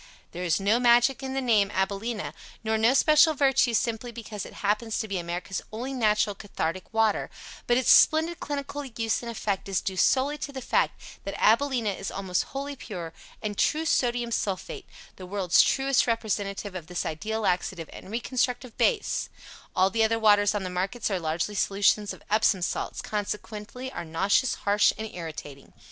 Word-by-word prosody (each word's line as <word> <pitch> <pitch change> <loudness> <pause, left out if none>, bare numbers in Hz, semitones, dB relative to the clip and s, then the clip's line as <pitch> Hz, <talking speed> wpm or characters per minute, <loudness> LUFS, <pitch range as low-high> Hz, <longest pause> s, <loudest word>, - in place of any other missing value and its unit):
There 175 - -6
is 170 -1 +1
no 205 +4 +2
magic 240 +2 +4
in 265 0 -4
the 270 - 0
name, 215 -6 +3
AbilenA, 200 +4 -2 0.3
nor 220 0 0
no 225 +4 +3
special 305 +2 +5
virtue 270 -4 +3
simply 230 +2 -1
because 220 -3 -7
it - - -13
happens 215 +2 0
to 220 - -2
be 195 -3 -2
America's 175 +3 -4
only 245 +5 -4
natural 215 -4 +2
cathartic 185 -3 -4
water, 225 -2 +1 0.4
but 240 - +4
its 255 - +4
splendid 320 +2 +5
clinical 285 0 -4
value 230 -5 -5
and 235 - -6
effect 205 -4 -3
is 190 - +1
due 190 - -4
solely 275 +8 +2
to 280 - -5
the 270 - -6
fact 255 - 0 0.2
that 195 - -5
AbilenA 235 -2 +3
is 195 - -5
almost 190 -2 -2
wholly 280 +1 -5
pure 175 -10 -7 0.3
and 205 -1 -3
true 320 +1 +2
Sodium 240 -5 +1
Sulphate 195 -4 -3 0.3
the 185 - -9
world's 190 -3 +4
truest 270 -1 +2
representative 205 -3 -2
of 175 -4 -7
this 180 0 -3
ideal 220 +8 -3
laxative 180 -3 -1
and - - -11
reconstructive 245 +1 -2
base, 475 -4 +1 0.5
All 190 +1 +3
the 225 -1 +2
other 225 +1 +2
waters 205 -2 +4
on 205 - -1
the 185 - -4
markets 195 +5 -2
are 190 - 0
largely 165 +5 -2
solutions 200 +1 +2
of - - -10
Epsom 210 -3 +2
salts, - - -3
consequently 210 +4 -5
are 175 - -5
nauseous, 195 +9 +1
harsh 205 +1 +4
and 220 - -4
irritating. 155 -5 -8
215 Hz, 175 wpm, -27 LUFS, 195-245 Hz, 0.5 s, special